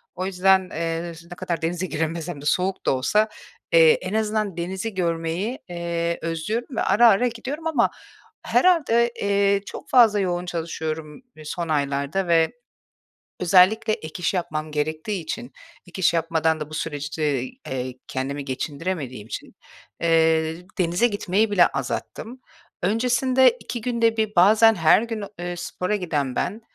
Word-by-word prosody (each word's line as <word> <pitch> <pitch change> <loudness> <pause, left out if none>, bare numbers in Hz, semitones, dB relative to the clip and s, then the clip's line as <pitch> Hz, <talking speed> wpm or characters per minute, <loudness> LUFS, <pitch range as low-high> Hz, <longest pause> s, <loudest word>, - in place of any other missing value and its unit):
O 185 - -3
yüzden, 190 0 +3
eee, 165 +1 -3 0.2
ne - - -6
kadar 170 -2 -3
denize 175 +3 -1
giremesem 160 -1 -3
de - - -10
soğuk 185 +4 0
da - - +3
olsa, 210 +12 +2 0.4
eee, 485 -1 +7
en - - -4
azından 215 -4 -1
denizi 190 +5 -4
görmeyi, 170 +6 -2
eee, 170 -1 -2
özlüyorum 210 - -3
ve - - +1
ara 230 +5 +5
ara 225 +5 +3
gidiyorum 270 +8 -5
ama 275 -7 +2 0.6
herhâlde, 240 -10 +3
eee, 200 0 +2
çok - - -9
fazla 225 -5 +5
yoğun 180 -2 -1
çalışıyorum 160 - -5 0.2
son 170 +1 -4
aylarda 140 +5 -1
ve 165 -1 +3 0.9
özellikle 190 +5 +4
ek 155 -6 -5
iş - - +1
yapmam 155 -3 -3
gerektiği 155 +6 -2
için 230 +10 -6 0.3
ek 190 - -8
iş 170 - +3
yapmadan 160 -1 +1
da 150 0 -6
bu - - -8
süreçte, 145 -3 -2
eee, 130 - -6
kendimi 140 +2 -3
geçindiremediğim 140 - -4
için, - - -8 0.5
eee, 160 -1 +2 0.2
denize 180 +6 +2
gitmeyi 205 +1 0
bile 180 -4 +5
azalttım. 250 +3 -5 0.4
Öncesinde 250 +5 +3
2 235 +2 -5
günde 230 -1 +1
1 215 -1 0
bazen 220 +5 +6
her 165 +4 +4
gün, 225 -3 -4
eee, 175 0 -4
spora 180 +4 -2
giden 145 -8 -2
ben, 215 +3 -2
180 Hz, 145 wpm, -23 LUFS, 160-215 Hz, 0.9 s, eee